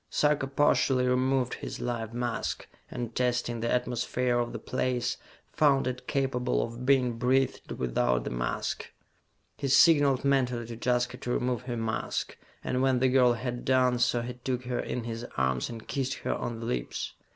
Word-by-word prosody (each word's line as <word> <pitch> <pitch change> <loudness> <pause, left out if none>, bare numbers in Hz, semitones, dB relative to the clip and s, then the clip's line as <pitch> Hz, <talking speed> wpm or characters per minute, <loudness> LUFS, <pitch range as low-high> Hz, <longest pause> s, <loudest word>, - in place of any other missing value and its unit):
Sarka 150 -2 +2
partially 135 -2 +3
removed 130 0 +1
his - - -6
life 115 -2 -3
mask, 120 0 -3 0.2
and 120 -2 -5
testing 125 -1 0
the 115 +1 -1
atmosphere 125 0 0
of 120 0 -1
the - - -4
place, 125 -1 -1 0.4
found 140 -3 +3
it 125 0 -4
capable 125 - 0
of 120 +2 -6
being 125 -4 +3
breathed 130 +1 +1
without - - 0
the - - -4
mask. - - -3 0.7
He 140 - -1
signalled 140 -1 +5
mentally 125 -4 +1
to 115 +1 -7
Jaska 125 +1 0
to 125 - -7
remove 125 -1 0
her 120 -2 -3
mask, 115 -1 -2 0.3
and 125 - -1
when 130 -1 +3
the 130 +1 +3
girl 125 -2 +5
had 120 +1 -4
done 130 -1 +3
so 120 -1 +2
he 125 +1 -5
took 125 0 -3
her 125 0 -2
in 125 - -3
his 115 0 -5
arms 65 -1 +1
and 115 -2 -8
kissed 135 -1 -1
her - - +1
on 115 -1 -4
the - - -4
lips. 60 - -3
125 Hz, 175 wpm, -29 LUFS, 120-130 Hz, 0.7 s, signalled